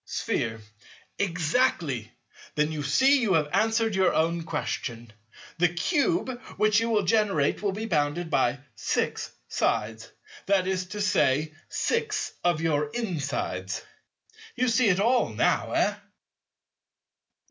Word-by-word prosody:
Sphere. 110 0 -2 0.6
Exactly. 165 - 0 0.4
Then 150 +1 +1
you 155 -1 -3
see 270 - +4
you 210 -5 +2
have 150 -2 +2
answered 225 0 +2
your 190 -2 +2
own 165 +1 +1
question. 115 -7 -4 0.5
The 175 - +5
Cube 265 - 0 0.2
which 215 0 +4
you 230 +1 -1
will 215 -3 +2
generate 190 -7 +2
will 205 -1 0
be 215 +3 -4
bounded 160 -2 0
by 130 +1 +1
six - - -1 0.2
sides, 110 +2 -1 0.4
that 195 -2 +3
is 185 -1 -1
to 210 +3 -5
say, 155 -6 +2 0.2
six 450 -2 -1
of 175 -3 +2
your 150 -2 +1
insides. 145 - -3 0.7
You 255 +1 +1
see 230 -1 +3
it 185 -1 +2
all 240 +4 +3
now, - - +1
eh? - - +2
175 Hz, 125 wpm, -27 LUFS, 145-225 Hz, 0.7 s, The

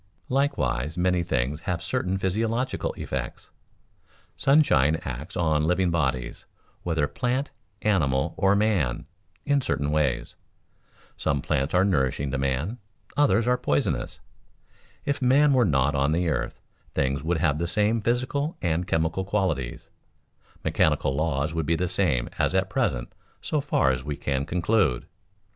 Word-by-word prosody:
Likewise 110 - 0
many 90 0 +2
things 70 -3 -1
have 85 +1 -2
certain 95 +1 -1
physiological 115 +7 -1
effects. 65 -2 -5 0.8
Sunshine 80 - +4
acts 65 +3 -6
on 80 -3 +2
living 90 0 +2
bodies, 65 -7 -2 0.3
whether 80 -4 0
plant, 125 - -2 0.3
animal, 70 -11 +1
or 95 +1 +3
man, 100 - +1 0.4
in 145 -1 +2
certain 70 - -1
ways. 75 -4 0 0.8
Some 70 - 0
plants 70 +4 -1
are 90 +2 +4
nourishing 70 -6 0
to 70 - -1
man, 70 - -1 0.4
others 115 -6 +3
are 125 0 +2
poisonous. 75 - -1 0.9
If 140 0 -1
man 140 +3 +5
were 125 -3 +4
not 70 0 +2
on 70 +2 +1
the 85 +1 +1
earth, 70 - -2 0.4
things 70 +1 0
would 85 +3 0
have 80 -2 +1
the 85 - -1
same 105 +5 +1
physical 130 +7 -1
and 85 +1 -1
chemical 80 +2 0
qualities, 95 -11 -2 0.8
mechanical 70 - +2
laws 75 0 -1
would 80 -2 -2
be 85 - +2
the 90 +2 -1
same 85 -10 +1
as - - +1
at - - +1
present - - -1 0.3
so 150 - -1
far 70 - +2
as 65 -1 -3
we 75 -1 -4
can 70 0 -2
conclude. 90 - +1
85 Hz, 140 wpm, -26 LUFS, 70-105 Hz, 0.9 s, man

